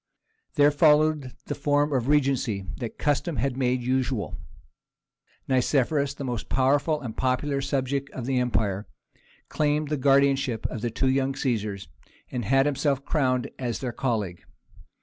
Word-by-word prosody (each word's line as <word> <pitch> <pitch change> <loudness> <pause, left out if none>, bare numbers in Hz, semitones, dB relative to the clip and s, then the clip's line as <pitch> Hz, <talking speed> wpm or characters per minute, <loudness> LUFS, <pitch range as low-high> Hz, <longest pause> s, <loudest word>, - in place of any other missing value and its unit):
There 145 -2 +5
followed 150 -2 +3
the - - -3
form 145 +1 +1
of 125 -2 0
regency 135 -9 +1
that 120 -4 -6
custom 150 +3 0
had 130 +1 -1
made 125 -1 0
usual. 130 -3 -1 1.1
Nicephorus, 140 +2 +1
the 140 - -6
most 120 -4 -4
powerful 145 +4 +2
and 120 -6 -6
popular 135 +2 0
subject 140 0 -1
of 125 - -6
the 130 -1 +1
empire, 110 -5 -1 0.6
claimed 150 0 0
the 150 - 0
guardianship 135 -3 +2
of 115 - -5
the 120 - -1
two 130 +4 0
young 135 0 +1
Caesars, 105 -7 -2 0.4
and 120 -4 -3
had 135 +5 +3
himself 140 -1 0
crowned 130 -5 0
as 120 -3 -2
their 125 -3 -4
colleague. 105 -10 -2
135 Hz, 145 wpm, -26 LUFS, 125-145 Hz, 1.1 s, There